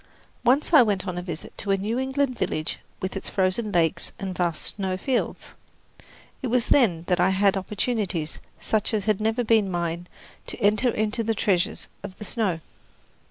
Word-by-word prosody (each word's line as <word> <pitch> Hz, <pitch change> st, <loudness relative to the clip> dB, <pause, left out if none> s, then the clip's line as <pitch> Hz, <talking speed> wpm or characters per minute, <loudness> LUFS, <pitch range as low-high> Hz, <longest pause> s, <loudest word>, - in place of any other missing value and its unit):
Once 265 Hz, +7 st, +3 dB
I 300 Hz, -, +10 dB
went 205 Hz, -4 st, +1 dB
on 180 Hz, -1 st, -2 dB
a -, -, -3 dB
visit 170 Hz, -3 st, -7 dB
to 200 Hz, -, -4 dB
a 195 Hz, -, +4 dB
New 215 Hz, +5 st, -1 dB
England 265 Hz, 0 st, 0 dB
village 155 Hz, -8 st, -2 dB, 0.2 s
with 190 Hz, +1 st, -3 dB
its 195 Hz, -, -4 dB
frozen 195 Hz, +3 st, +1 dB
lakes 165 Hz, -4 st, +1 dB
and 190 Hz, -2 st, -4 dB
vast 170 Hz, -3 st, -1 dB
snow 190 Hz, -2 st, -1 dB
fields. 250 Hz, +6 st, -2 dB, 0.9 s
It 260 Hz, -, -2 dB
was 245 Hz, 0 st, +2 dB
then 190 Hz, -, +4 dB
that 180 Hz, -1 st, +1 dB
I 180 Hz, +1 st, +4 dB
had 195 Hz, +1 st, +3 dB
opportunities 195 Hz, -4 st, -2 dB, 0.2 s
such 215 Hz, +5 st, 0 dB
as 205 Hz, -, -1 dB
had 215 Hz, -2 st, +1 dB
never 225 Hz, +3 st, +1 dB
been 220 Hz, -3 st, +3 dB
mine 170 Hz, -1 st, -2 dB, 0.4 s
to -, -, -5 dB
enter 215 Hz, +3 st, +3 dB
into 220 Hz, +1 st, 0 dB
the 225 Hz, 0 st, 0 dB
treasures 185 Hz, -4 st, 0 dB
of 195 Hz, -2 st, -8 dB
the 210 Hz, -, -7 dB
snow. 195 Hz, -9 st, 0 dB
200 Hz, 180 wpm, -25 LUFS, 185-225 Hz, 0.9 s, I